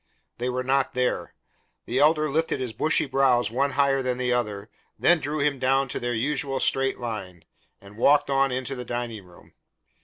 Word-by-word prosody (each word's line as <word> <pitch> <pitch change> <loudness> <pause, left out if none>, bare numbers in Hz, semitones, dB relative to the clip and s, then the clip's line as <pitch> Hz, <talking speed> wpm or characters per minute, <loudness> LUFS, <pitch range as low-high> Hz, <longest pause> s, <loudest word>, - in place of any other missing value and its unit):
They 125 +1 -1
were 125 0 -2
not 135 0 0
there. 125 0 -1 0.5
The 125 +3 -1
Elder 155 +1 +4
lifted 155 0 -1
his 125 -4 -4
bushy 155 +9 +2
brows 130 -4 +2
one 140 +3 0
higher 135 0 +2
than 125 -1 -2
the 125 -1 0
other, 105 -4 -2 0.3
then 175 -1 +4
drew 145 +1 -2
them 140 -2 0
down 135 +1 +1
to - - -4
their 120 0 -2
usual 135 +2 -1
straight 135 0 +1
line, 95 -8 -6 0.3
and 100 +1 -15
walked 145 +4 +4
on 135 0 +2
into 130 +1 -2
the 125 -2 -5
dining 120 -3 -5
room. 90 -1 -19
130 Hz, 185 wpm, -25 LUFS, 120-140 Hz, 0.5 s, Elder